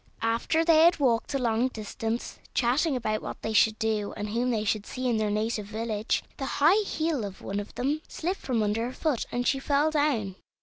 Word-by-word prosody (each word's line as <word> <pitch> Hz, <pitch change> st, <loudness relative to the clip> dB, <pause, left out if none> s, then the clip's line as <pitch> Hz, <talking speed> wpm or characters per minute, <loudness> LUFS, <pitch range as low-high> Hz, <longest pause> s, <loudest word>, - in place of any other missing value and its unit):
After 230 Hz, +8 st, +1 dB
they 325 Hz, -2 st, +6 dB
had 340 Hz, 0 st, +5 dB
walked 245 Hz, -5 st, +1 dB
a -, -, +3 dB
long 235 Hz, -1 st, +1 dB
distance, 225 Hz, 0 st, -4 dB, 0.2 s
chatting 265 Hz, +5 st, +2 dB
about 215 Hz, -3 st, -1 dB
what -, -, -6 dB
they 220 Hz, -, -2 dB
should 220 Hz, 0 st, +4 dB
do 215 Hz, -2 st, -1 dB
and 210 Hz, 0 st, -3 dB
whom 240 Hz, +4 st, 0 dB
they 220 Hz, -3 st, 0 dB
should 210 Hz, 0 st, -1 dB
see 255 Hz, 0 st, -3 dB
in 235 Hz, -2 st, +2 dB
their 215 Hz, -1 st, 0 dB
native 215 Hz, 0 st, -1 dB
village, 220 Hz, 0 st, -1 dB
the 270 Hz, -, -3 dB
high 340 Hz, +9 st, +5 dB
heel 315 Hz, -6 st, -1 dB
of 195 Hz, -2 st, -7 dB
one 200 Hz, +1 st, -2 dB
of 205 Hz, -, -8 dB
them 285 Hz, +5 st, -1 dB
slipped 365 Hz, +4 st, -3 dB
from 240 Hz, -5 st, 0 dB
under 215 Hz, +3 st, 0 dB
her 255 Hz, -, -6 dB
foot, 295 Hz, -6 st, -1 dB
and 245 Hz, 0 st, -1 dB
she 270 Hz, -, +2 dB
fell 285 Hz, +3 st, +2 dB
down. 255 Hz, -11 st, 0 dB
235 Hz, 215 wpm, -27 LUFS, 215-280 Hz, 0.2 s, they